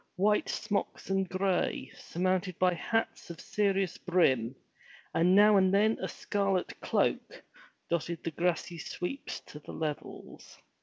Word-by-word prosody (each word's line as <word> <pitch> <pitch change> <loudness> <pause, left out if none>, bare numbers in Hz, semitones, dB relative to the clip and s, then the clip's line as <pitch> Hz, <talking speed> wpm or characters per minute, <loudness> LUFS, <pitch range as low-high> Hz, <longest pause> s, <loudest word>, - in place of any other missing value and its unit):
White 210 +3 +2
smocks 205 -2 -2
and 195 -1 +1
gray, 185 -1 0
surmounted 185 0 -1
by 180 -1 +3
hats 225 +5 -2
of 170 - -8
serious 195 -3 0
brim, 135 -10 +2 0.6
and 180 +3 +4
now 210 0 +7
and 190 -1 +4
then 210 +3 +3
a - - -1
scarlet 195 -3 -1
cloak, - - 0 0.5
dotted 170 0 -2
the 165 - -2
grassy 170 0 -1
sweeps 180 - -5
to 150 - -11
the - - -10
levels. 155 -2 -6
185 Hz, 135 wpm, -30 LUFS, 170-200 Hz, 0.6 s, now